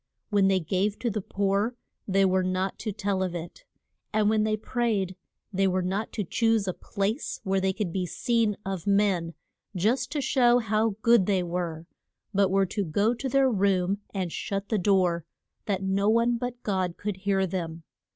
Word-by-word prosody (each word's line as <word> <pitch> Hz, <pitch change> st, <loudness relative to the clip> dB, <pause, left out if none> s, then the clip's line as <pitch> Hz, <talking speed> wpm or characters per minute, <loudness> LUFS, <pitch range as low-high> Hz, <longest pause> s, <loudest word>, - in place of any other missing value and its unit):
When 200 Hz, -2 st, +4 dB
they 190 Hz, -1 st, +3 dB
gave 195 Hz, +5 st, 0 dB
to 235 Hz, -, -1 dB
the 210 Hz, 0 st, -2 dB
poor 200 Hz, +5 st, 0 dB, 0.3 s
they 195 Hz, 0 st, +3 dB
were 185 Hz, 0 st, +3 dB
not 185 Hz, +1 st, -1 dB
to 215 Hz, -, -3 dB
tell 200 Hz, -1 st, -1 dB
of 185 Hz, -2 st, -1 dB
it; 170 Hz, 0 st, -8 dB, 0.5 s
and 215 Hz, -1 st, +2 dB
when 215 Hz, -1 st, +2 dB
they 215 Hz, 0 st, +1 dB
prayed 215 Hz, -5 st, -1 dB, 0.4 s
they 195 Hz, +1 st, +2 dB
were 185 Hz, 0 st, +1 dB
not 195 Hz, +4 st, -2 dB
to 210 Hz, -, -1 dB
choose 225 Hz, +2 st, +1 dB
a 185 Hz, -, 0 dB
place 205 Hz, -, -3 dB
where 190 Hz, -1 st, +1 dB
they 190 Hz, 0 st, +2 dB
could 190 Hz, -3 st, -3 dB
be 185 Hz, -2 st, -1 dB
seen 225 Hz, +2 st, 0 dB
of 190 Hz, -2 st, -4 dB
men 195 Hz, -5 st, +2 dB, 0.4 s
just 215 Hz, +9 st, +1 dB
to 300 Hz, -, -1 dB
show 245 Hz, -3 st, +4 dB
how 220 Hz, -2 st, +1 dB
good 230 Hz, -5 st, +5 dB
they 190 Hz, -3 st, +2 dB
were 170 Hz, -2 st, -3 dB, 0.5 s
but 195 Hz, -1 st, +3 dB
were 195 Hz, 0 st, +3 dB
to 205 Hz, +2 st, -2 dB
go 200 Hz, +7 st, +1 dB
to 260 Hz, +3 st, -4 dB
their 270 Hz, 0 st, +3 dB
room 195 Hz, -2 st, +1 dB
and 185 Hz, -4 st, -3 dB
shut 195 Hz, +2 st, -3 dB
the 220 Hz, -, +1 dB
door, 180 Hz, -3 st, +2 dB, 0.4 s
that 195 Hz, -2 st, -1 dB
no 195 Hz, +2 st, +1 dB
one 235 Hz, +2 st, +3 dB
but 245 Hz, +1 st, -5 dB
God 185 Hz, -4 st, -1 dB
could 205 Hz, -2 st, -3 dB
hear 195 Hz, 0 st, +1 dB
them. 165 Hz, -3 st, -4 dB
195 Hz, 190 wpm, -27 LUFS, 185-215 Hz, 0.5 s, good